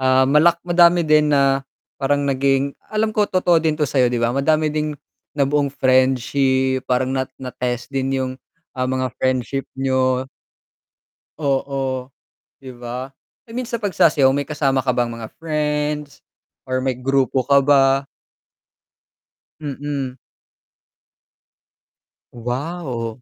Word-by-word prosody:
Ah, 130 Hz, 0 st, +4 dB
malak 150 Hz, +5 st, +4 dB
madami 175 Hz, 0 st, +4 dB
din 150 Hz, -1 st, +4 dB
na 135 Hz, 0 st, +3 dB, 0.4 s
parang 145 Hz, +1 st, +1 dB
naging 135 Hz, 0 st, +1 dB, 0.2 s
alam 215 Hz, 0 st, 0 dB
ko 210 Hz, -1 st, +1 dB
totoo 175 Hz, -3 st, +3 dB
din 155 Hz, -1 st, 0 dB
to 150 Hz, -, +1 dB
sa'yo 130 Hz, -2 st, +2 dB
'di 120 Hz, -, -2 dB
ba 115 Hz, 0 st, +1 dB
madami 155 Hz, +3 st, +1 dB
din 150 Hz, -1 st, -2 dB, 0.4 s
nabuong 140 Hz, 0 st, +2 dB
friendship, 130 Hz, 0 st, +2 dB
parang 130 Hz, +1 st, +1 dB
na 130 Hz, -1 st, -1 dB
na 130 Hz, -1 st, -7 dB
test 125 Hz, +1 st, -4 dB
din 135 Hz, -1 st, -1 dB
yung, 130 Hz, -1 st, -2 dB, 0.4 s
ah, 130 Hz, 0 st, -1 dB
mga 130 Hz, -1 st, -1 dB
friendship 130 Hz, +1 st, -1 dB
niyo. 130 Hz, -1 st, +1 dB, 1.1 s
Oo, 135 Hz, -2 st, -2 dB, 0.5 s
'di 130 Hz, -2 st, -10 dB
ba? 125 Hz, +2 st, -6 dB, 0.4 s
I 230 Hz, -, -9 dB
mean 255 Hz, -, -2 dB
sa 235 Hz, -1 st, -4 dB
pagsasayaw 160 Hz, -8 st, +3 dB
may 145 Hz, -, -1 dB
kasama 135 Hz, -3 st, 0 dB
ka 125 Hz, -, +2 dB
bang 120 Hz, -1 st, 0 dB
mga 115 Hz, -1 st, -8 dB
friends 150 Hz, -2 st, -2 dB, 0.5 s
or 130 Hz, 0 st, -1 dB
may 130 Hz, -, +1 dB
grupo 130 Hz, +1 st, 0 dB
ka 140 Hz, +2 st, +3 dB
ba? 135 Hz, -1 st, +4 dB, 1.6 s
Mm. 140 Hz, -2 st, -4 dB, 2.2 s
Wow. 125 Hz, -1 st, -4 dB
135 Hz, 125 wpm, -20 LUFS, 130-150 Hz, 2.2 s, Ah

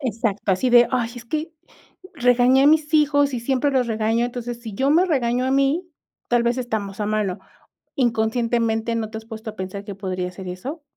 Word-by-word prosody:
Exacto, 225 Hz, -6 st, -1 dB
así 220 Hz, +8 st, 0 dB
de: 240 Hz, 0 st, +7 dB
"Ay, 240 Hz, -3 st, 0 dB
es 240 Hz, -, -9 dB
que 310 Hz, +6 st, -4 dB, 0.6 s
regañé 250 Hz, -1 st, +4 dB
a -, -, +5 dB
mis 305 Hz, 0 st, +3 dB
hijos 285 Hz, -2 st, +3 dB
y 240 Hz, -, -3 dB
siempre 265 Hz, +4 st, 0 dB
los 260 Hz, -3 st, +1 dB
regaño, 225 Hz, +1 st, 0 dB
entonces, 240 Hz, -1 st, -6 dB
si 225 Hz, -3 st, -8 dB
yo 270 Hz, +7 st, +1 dB
me 335 Hz, +5 st, +5 dB
regaño 250 Hz, -6 st, 0 dB
a -, -, 0 dB
mí, 275 Hz, +6 st, +1 dB, 0.4 s
tal 240 Hz, -1 st, +3 dB
vez 235 Hz, +2 st, 0 dB
estamos 215 Hz, -5 st, -4 dB
a 210 Hz, -, -1 dB
mano". 210 Hz, -3 st, -1 dB, 0.6 s
Inconscientemente, 230 Hz, -1 st, 0 dB
¿no 220 Hz, -2 st, -3 dB
te 220 Hz, -, -6 dB
has 220 Hz, -, -13 dB
puesto 220 Hz, 0 st, -7 dB
a 215 Hz, -, -17 dB
pensar 190 Hz, +1 st, -6 dB
que 205 Hz, -1 st, -7 dB
podría 185 Hz, -2 st, -4 dB
ser 185 Hz, 0 st, -8 dB
eso? 260 Hz, -, -6 dB
235 Hz, 200 wpm, -22 LUFS, 220-265 Hz, 0.6 s, de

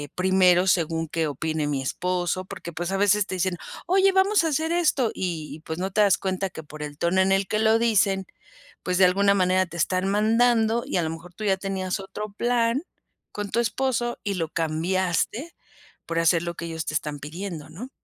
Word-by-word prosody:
primero 185 Hz, -1 st, +4 dB
según 165 Hz, -2 st, +1 dB
qué 160 Hz, 0 st, -1 dB
opine 155 Hz, +1 st, -2 dB
mi 140 Hz, -2 st, -1 dB
esposo", 180 Hz, +4 st, -1 dB
porque, 170 Hz, -2 st, -8 dB
pues, 175 Hz, +3 st, -3 dB
a 195 Hz, -, 0 dB
veces 205 Hz, 0 st, +3 dB
te 185 Hz, -, -4 dB
dicen: 180 Hz, -1 st, -1 dB, 0.3 s
"Oye 385 Hz, +2 st, +4 dB
vamos 385 Hz, 0 st, +3 dB
a -, -, +1 dB
hacer 315 Hz, +3 st, 0 dB
esto", 295 Hz, -9 st, +2 dB
y 160 Hz, -4 st, -4 dB
pues, 160 Hz, -, -4 dB
no 190 Hz, +1 st, -2 dB
te 210 Hz, -, +2 dB
das 200 Hz, -2 st, +4 dB
cuenta 190 Hz, 0 st, -2 dB
que 160 Hz, -, -9 dB
por 150 Hz, 0 st, -11 dB
el 145 Hz, -1 st, -7 dB
tono 180 Hz, +3 st, +2 dB
en 190 Hz, +1 st, +2 dB
el 195 Hz, 0 st, +2 dB
que 215 Hz, -, 0 dB
lo 220 Hz, +1 st, +4 dB
dicen, 200 Hz, -4 st, +2 dB, 0.6 s
pues, 180 Hz, 0 st, 0 dB
de 190 Hz, -, +6 dB
alguna 200 Hz, +2 st, +4 dB
manera 185 Hz, 0 st, +3 dB
te 170 Hz, 0 st, -9 dB
están 185 Hz, +3 st, 0 dB
mandando. 225 Hz, +2 st, +3 dB
Y -, -, -2 dB
a 175 Hz, -, +1 dB
lo 160 Hz, -, -1 dB
mejor 170 Hz, +2 st, -10 dB
tú 215 Hz, -, -7 dB
ya 195 Hz, -1 st, +3 dB
tenías 190 Hz, 0 st, -3 dB
otro 200 Hz, +2 st, -7 dB
plan 240 Hz, +4 st, +1 dB, 0.5 s
con 205 Hz, -1 st, -5 dB
tu 235 Hz, -, +1 dB
esposo 240 Hz, +1 st, 0 dB
y 200 Hz, -2 st, -2 dB
lo 165 Hz, -3 st, -2 dB
cambiaste 180 Hz, -, -1 dB, 0.5 s
por 165 Hz, 0 st, -1 dB
hacer 165 Hz, 0 st, +3 dB
lo 170 Hz, 0 st, -4 dB
que 170 Hz, -, -6 dB
ellos 160 Hz, -1 st, -4 dB
te -, -, -3 dB
están 150 Hz, -1 st, -2 dB
pidiendo, 165 Hz, +1 st, -7 dB
¿no? 235 Hz, +11 st, -8 dB
190 Hz, 210 wpm, -25 LUFS, 170-215 Hz, 0.6 s, de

